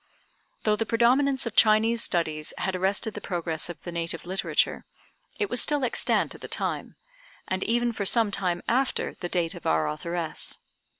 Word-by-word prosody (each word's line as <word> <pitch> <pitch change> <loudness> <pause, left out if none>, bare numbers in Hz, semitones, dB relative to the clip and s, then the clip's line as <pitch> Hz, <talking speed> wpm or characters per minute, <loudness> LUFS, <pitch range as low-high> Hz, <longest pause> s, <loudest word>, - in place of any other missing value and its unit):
Though 215 -1 +3
the 225 +1 -2
predominance 260 +4 +3
of 230 - -4
Chinese 225 +1 +5
studies 155 -6 -1
had 190 0 -1
arrested 195 +4 0
the - - -7
progress 170 -3 -3
of 175 - -8
the 175 - -6
native 165 -1 -2
literature, 190 +2 0 0.5
it 415 - 0
was 245 - +1
still 295 -2 +1
extant 240 - +1
at - - -13
the - - -6
time, - - -3 0.5
and 185 0 -1
even 240 +1 +1
for 215 -3 -3
some 225 -2 +4
time 180 -3 -1
after 260 +3 +1
the 175 - -6
date 175 -1 +1
of 175 - -7
our 80 -1 +2
authoress. 165 - -2
195 Hz, 175 wpm, -26 LUFS, 170-230 Hz, 0.5 s, Chinese